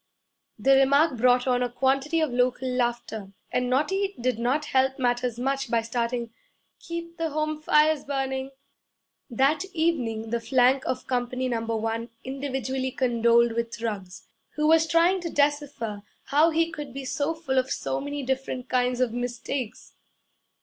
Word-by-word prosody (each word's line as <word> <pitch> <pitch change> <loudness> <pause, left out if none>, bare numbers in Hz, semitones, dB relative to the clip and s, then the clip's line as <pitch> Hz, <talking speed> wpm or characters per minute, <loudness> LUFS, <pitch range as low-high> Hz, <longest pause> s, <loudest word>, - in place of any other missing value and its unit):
The 270 +6 +4
remark 280 +2 +4
brought 250 +1 +4
on 250 -1 +2
a 245 - 0
quantity 270 +5 +1
of 310 -4 0
local 250 +1 +1
laughter, 240 -5 -2 0.2
and 250 0 0
Naughty 385 +10 0
did 245 -1 0
not 265 +6 0
help 265 -1 +1
matters 245 -2 0
much 270 +1 -1
by 230 -1 +1
starting, 235 0 -2 0.5
'Keep 335 0 -7
the 330 -1 -1
home 310 0 -2
fires 305 -1 +3
burning.' 270 -1 -2 0.8
That 275 +7 +2
evening 240 -10 0
the 235 - +1
flank 255 +2 +3
of 255 0 -2
Company 250 0 -1
Number 230 -1 -1
1 225 +1 -2
individually 265 -1 -3
condoled 235 -2 +3
with 230 0 -3
Ruggs, 195 -5 -5 0.3
who 300 - 0
was 320 +1 +5
trying 345 +3 +3
to 340 - -3
decipher 285 -8 -1 0.2
how 300 +4 +4
he 330 +1 +1
could 290 -5 -7
be 275 -1 -5
so 290 +5 -1
full 270 -5 0
of 260 +1 -2
so 135 - -2
many 285 0 -4
different 260 -1 -3
kinds 250 0 +1
of 245 -3 +1
mistakes. 245 0 -4
260 Hz, 155 wpm, -26 LUFS, 240-290 Hz, 0.8 s, was